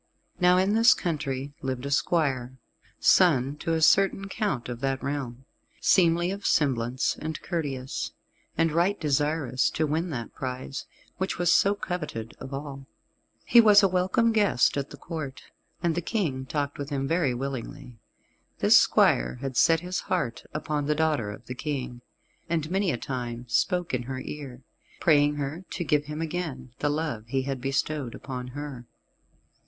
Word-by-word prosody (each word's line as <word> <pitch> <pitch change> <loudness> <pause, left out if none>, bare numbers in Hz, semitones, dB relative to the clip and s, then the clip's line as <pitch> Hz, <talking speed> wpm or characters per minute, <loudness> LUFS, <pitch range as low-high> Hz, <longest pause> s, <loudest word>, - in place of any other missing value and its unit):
Now 180 0 +5
in 190 +2 +2
this 230 +3 +6
country 145 -4 -3
lived 130 0 -3
a 140 - -3
squire, 135 -5 0 0.4
son 145 -7 +4
to 165 +2 -2
a 160 - 0
certain 195 +2 +4
count 195 - -2
of 120 -1 -5
that 135 0 -2
realm, 135 -3 -4 0.3
seemly 175 -1 +3
of 200 +1 -6
semblance 130 -3 +1
and 155 -1 -4
courteous, 140 -7 -3 0.5
and 165 -1 +3
right 175 +6 +1
desirous 145 -3 +1
to 155 - 0
win 160 +4 -1
that 120 -7 -5
prize, 130 +1 -5 0.3
which 190 +1 -1
was 175 0 +3
so 200 +1 +4
coveted 155 - -5
of 130 - -8
all. 135 -1 -6 0.6
He 240 - +7
was 210 -2 +7
a - - +6
welcome 190 +6 +2
guest 205 - +3
at 140 -1 -2
the - - -10
Court, 155 -5 -6 0.4
and 170 -1 +2
the 175 - -1
King 155 - -2
talked 145 0 -2
with 140 0 -4
him 135 -2 -2
very 160 -6 +1
willingly. 130 -1 -6 0.6
This - - +5
squire - - +3
had 130 +1 -5
set 165 +5 +4
his 180 +1 -3
heart 160 -11 -1
upon 150 -1 -2
the 150 - +2
daughter 150 -8 +1
of 105 - -9
the 125 - -5
King, 130 -3 -4 0.5
and 160 -1 -1
many 195 0 +1
a 125 - 0
time 120 -2 -5
spoke 175 +7 0
in 125 - 0
her 130 +1 -5
ear, 135 -3 -8 0.4
praying 145 -2 +4
her 145 +5 -4
to 175 - -3
give 150 -2 +1
him 150 +2 -5
again 150 -7 -5
the 145 - +1
love 145 -8 -2
he 130 +2 -1
had 135 -1 -4
bestowed 135 -1 -2
upon 125 -2 -6
her. 130 -2 -7
145 Hz, 165 wpm, -27 LUFS, 130-170 Hz, 0.6 s, He